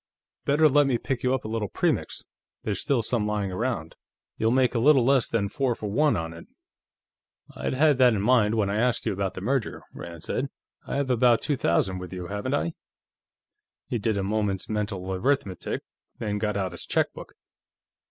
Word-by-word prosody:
Better 150 +2 +5
let 145 0 +4
me 125 -3 +2
pick 130 +1 -3
you 125 - +1
up 130 - -5
a - - -2
little 110 -1 -2
Premix; - - -1 0.4
there's 100 -3 -2
still 130 -5 +1
some 110 -2 0
lying 105 -2 -1
around. 100 -5 -2 0.4
You'll 110 - +1
make 125 0 +3
a 120 - +1
little 135 0 +5
less 135 -2 +4
than 105 -3 0
four 130 +1 0
for 105 -2 -5
one 145 0 +3
on 80 0 -4
it." 85 - -12 1.1
"I'd - - -2
had 145 -1 +4
that 125 -3 +6
in 100 - -1
mind 115 -2 +4
when 105 -3 +2
I 100 +1 -1
asked 120 +1 +1
you - - +1
about 95 0 -2
the - - -6
merger," 125 +2 -1
Rand 85 -1 -9
said. 135 +9 -2 0.4
"I - - -3
have 140 -2 0
about 120 -1 +4
two 145 - 0
thousand 95 -3 +1
with 90 0 -8
you, 90 -1 -5
haven't 105 +8 -2
I?" 165 +3 -1 1.2
He 120 - -1
did 110 0 0
a 100 - -1
moment's 100 -1 -1
mental 100 -3 -3
arithmetic, 100 -3 -1 0.3
then 105 -2 -2
got 105 -1 -1
out 95 -2 -1
his 85 - -8
checkbook. - - -1
110 Hz, 195 wpm, -26 LUFS, 100-130 Hz, 1.2 s, that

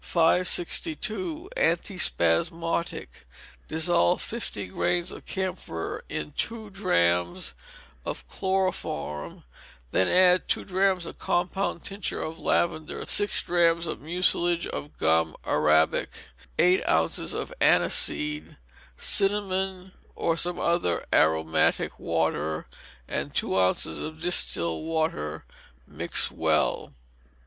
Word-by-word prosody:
562. 220 - +1
Antispasmodic. 170 - 0 0.6
Dissolve 170 +2 +2
fifty 215 - -4
grains 175 - -1
of - - -11
camphor 185 - -4
in 75 -1 -4
two 220 -2 -3
drachms 85 - 0 0.5
of - - -6
chloroform, 185 - -2
and - - -19 0.5
then 95 - +2
add 180 0 +4
two - - 0
drachms 190 -2 +1
of - - -9
compound 180 0 -1
tincture 195 -1 -3
of 160 +1 -6
lavender, 155 -2 -1
six 205 -1 +2
drachms 170 -1 +2
of 155 - -4
mucilage 175 +1 +2
of 145 - -6
gum 80 0 +2
arabic, 75 +1 +2 0.5
eight 180 +2 +4
ounces - - +1
of - - -4
aniseed, 305 0 +1 0.4
cinnamon, 190 -2 +1 0.2
or 165 - 0
some 175 +1 +1
other 170 - 0
aromatic 80 0 +2
water, 80 -1 -1 0.4
and - - -4
two - - +1
ounces 90 -4 +2
of 155 0 -6
distilled 85 - +2
water; 160 - -2 0.4
mix - - +1
well. - - 0
170 Hz, 105 wpm, -26 LUFS, -, 0.6 s, add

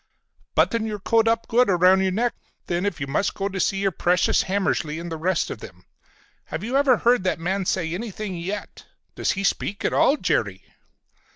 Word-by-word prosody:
"Button 230 -1 +2
your 210 -1 -3
coat 225 +3 +2
up 230 0 +1
good 245 0 +3
around 185 +1 +5
your 190 -1 +1
neck, 235 +5 0 0.3
then, 175 +3 -1
if 175 - -3
you 140 - -2
must 140 +8 -1
go 195 0 -2
to 190 -1 -5
see 195 - +1
your 195 0 +1
precious 180 +1 +2
Hammersly 185 -5 -1
and 170 0 -7
the - - -2
rest 170 +2 -1
of - - -6
them. - - -12 0.6
Have 170 - -5
you 240 +4 -3
ever 275 -3 +4
heard 240 -4 +3
that 185 - 0
man 190 +3 -1
say 170 -3 -1
anything 210 -1 -5
yet? 190 +5 -6 0.3
Does - - 0
he 195 - -4
speak 200 0 -1
at - - +1
all, 285 - +4
Jerry?" 110 - -1
195 Hz, 200 wpm, -23 LUFS, 175-220 Hz, 0.6 s, around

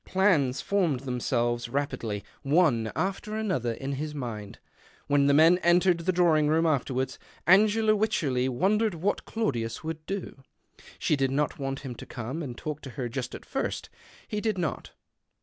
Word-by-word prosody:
Plans 165 -9 +2
formed 175 -10 +1
themselves 120 -2 -1
apidly, 115 -6 -3 0.2
one 140 -7 +2
after 195 +3 -2
another, 185 - -1
in 135 +4 -5
his 150 +2 -4
mind. 110 -7 -6 0.5
When 140 -1 +3
the 140 - +4
men 165 +4 +6
entered 175 0 +4
the 175 +2 0
drawing 165 -4 +3
room 160 +2 +3
afterwards, 130 -4 0 0.3
Angela 215 +5 +5
Wycherley 140 -12 +1
wondered 195 - +1
what 190 +5 -1
Claudius 120 - -2
would 160 0 -5
do. 195 -8 -5 0.6
She - - +1
did 135 -1 +1
not 145 +4 -1
want 135 0 -3
him 135 -3 -6
to 115 - -11
!ome 130 +9 -3
and 125 -6 -6
talk 150 -1 -5
to 135 - -8
her 125 -3 -2
just 130 +1 -4
at - - -10
first. - - -3 0.4
He 210 - -3
did 215 -3 0
lot. 170 -3 -3
150 Hz, 165 wpm, -28 LUFS, 130-180 Hz, 0.6 s, men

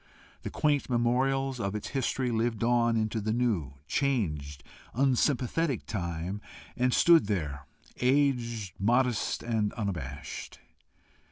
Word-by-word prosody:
The - - -5
quaint 145 -3 +1
memorials 130 +2 +1
of 100 -2 -2
its 105 - -4
history 130 -1 -1
lived 115 0 0
on 120 -1 +3
into 110 0 -1
the 110 +1 -1
new, 105 - 0
changed, 75 - -1 0.3
unsympathetic 135 +2 +1
time, 85 0 -3 0.3
and 125 +1 +2
stood 165 -3 +5
there, 75 -8 -3 0.3
aged, 125 - +1
modest, 120 +3 +1
and 110 -3 0
unabashed. 80 - -5
115 Hz, 110 wpm, -29 LUFS, 100-130 Hz, 0.3 s, stood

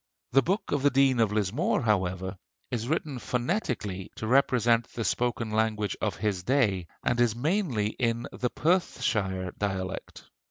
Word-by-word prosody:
The 135 - +6
'Book 190 - -1
of 145 - +1
the 145 - +5
Dean 135 -2 +3
of 110 -3 +3
Lismore,' 110 - 0
however, 95 -3 0 0.4
is 120 -2 -2
written 145 -3 -1
phonetically 120 - -2
to - - -5
represent 120 -2 +3
the 115 - -3
spoken 120 -1 -1
language 110 -2 0
of 105 - 0
his 100 -2 -1
day, 100 -6 +1 0.2
and 120 0 +1
is 115 -2 +3
mainly 140 - 0
in 115 -1 -1
the 125 - -2
Perthshire 105 - 0
dialect." 95 -2 -3
115 Hz, 150 wpm, -28 LUFS, 100-130 Hz, 0.4 s, The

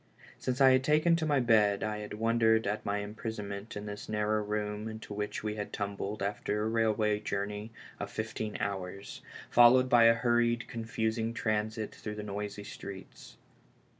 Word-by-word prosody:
Since 130 +1 -2
I 135 -1 +8
had 130 0 +4
taken 155 +4 +4
to 160 -2 -1
my 145 -2 +3
bed 105 -4 +3
I 105 0 -2
had 105 0 -6
wondered 115 0 +3
at 105 +2 -2
my 100 0 -1
imprisonment 105 -1 -6
in 105 - -6
this 105 0 -7
narrow 105 0 +1
room 105 0 -3
into 110 -1 -7
which 105 +1 -3
we 105 -1 -1
had 105 - -4
tumbled 100 0 -3
after 105 +1 -1
a - - 0
railway 110 -2 +2
journey 105 +1 -3 0.3
of 100 - -4
fifteen 110 0 -4
hours, 100 0 -4 0.3
followed 125 +2 +7
by 120 -2 +6
a 115 0 +7
hurried, 120 0 +1
confusing 115 0 -2
transit 110 -1 -1
through 105 -1 -6
the 105 - -5
noisy 105 0 -5
streets. 100 -2 -10
105 Hz, 165 wpm, -31 LUFS, 105-115 Hz, 0.3 s, I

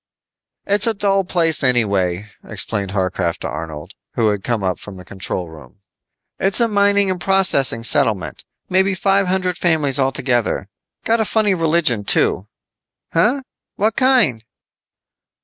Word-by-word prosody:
"It's 205 +2 +1
a 225 - 0
dull 195 -1 +1
place 165 -4 +2
anyway," 100 -6 +1
explained 100 -3 -4
Harcraft 95 -3 -2
to - - -3
Arnold, 80 +2 -7 0.2
who 115 -2 +2
had 105 -2 -2
come 115 -5 -2
up 90 -1 -2
to 100 - -10
the 90 -2 -12
control 95 -1 -5
room. 80 +2 -15 0.6
"It's 195 +4 +2
a 235 - +3
mining 200 -2 +2
and 180 -1 -5
processing 180 -12 +2
settlement. 115 - +1 0.2
Maybe 190 +1 +1
five 195 0 +1
hundred 185 -1 -1
families 150 -5 +1
altogether. 125 -6 0 0.4
Got 230 0 +2
a - - +3
funny 210 -2 +1
religion, 165 - +1
too." 95 -1 +1 0.7
"Huh, 250 +11 +1 0.3
what 215 +2 0
kind?" 250 - +3
140 Hz, 140 wpm, -18 LUFS, -, 0.7 s, a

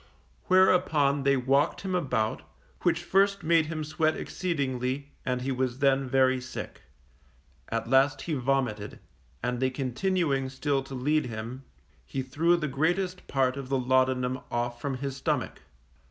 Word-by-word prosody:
Whereupon 180 -7 +4
they 140 -1 +4
walked 135 +4 +1
him 190 -1 -3
about, 125 -11 0 0.4
which 175 -1 +1
first 195 +1 +2
made 160 -1 +3
him 155 -1 -3
sweat 155 +1 0
exceedingly, 140 -5 -2 0.2
and 125 0 -1
he 135 - -1
was 130 -1 -1
then 135 -1 +2
very 130 0 +3
sick. 130 - -7 0.9
At 115 0 -2
last 135 +2 +3
he 165 - -3
vomited, 125 -6 -1 0.5
and 125 0 -1
they 130 0 +2
continuing 135 +2 0
still 135 +1 -1
to 135 - -7
lead 150 +3 +1
him, 115 +4 -6 0.4
he 130 - -4
threw 165 +7 +2
the 155 -3 -2
greatest 175 +7 -1
part 130 -1 +1
of 135 -2 -6
the 135 - +1
laudanum 130 0 +1
off 120 0 -2
from 135 0 -2
his 135 0 -4
stomach. 135 - -2
135 Hz, 150 wpm, -28 LUFS, 130-155 Hz, 0.9 s, Whereupon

